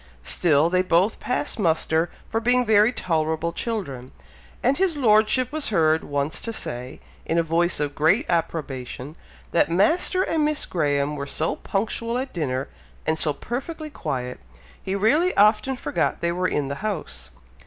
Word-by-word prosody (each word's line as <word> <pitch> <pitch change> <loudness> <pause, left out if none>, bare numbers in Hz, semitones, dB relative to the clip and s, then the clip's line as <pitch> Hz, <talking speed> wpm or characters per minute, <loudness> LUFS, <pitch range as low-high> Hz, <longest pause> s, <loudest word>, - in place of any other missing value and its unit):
Still 155 - +3
they 180 +1 +2
both 185 +3 +2
passed 250 - -2
muster 160 -2 +1 0.2
for 225 - -1
being 245 +2 +2
very 215 +1 +5
tolerable 160 -4 -1
children, 140 - -4 0.5
and 265 +6 +2
his 370 -5 +2
Lordship 225 +1 +3
was 310 -4 -1
heard 160 -5 +3
once 145 +1 -2
to 230 - -3
say, 125 - -5 0.2
in 165 - -1
a 170 - +3
voice 170 +1 +1
of 145 -1 -1
great 160 - +3
approbation, 145 -4 -3 0.4
that 170 - +3
Master 320 - +2
and 320 -4 0
Miss 300 0 +1
Graham 145 -3 0
were 140 -1 -5
so 160 +3 -1
punctual 230 +4 -2
at 260 +1 -4
dinner, 135 -5 -2 0.4
and 160 0 0
so 155 - 0
perfectly 295 - -5
quiet, 125 - -4 0.4
he 190 - -3
really 295 - +2
often 215 +6 +4
forgot 175 -8 -1
they 170 - +1
were 180 +1 0
in 145 -5 -1
the 140 - -3
house. 210 -7 -4
175 Hz, 160 wpm, -24 LUFS, 155-230 Hz, 0.5 s, very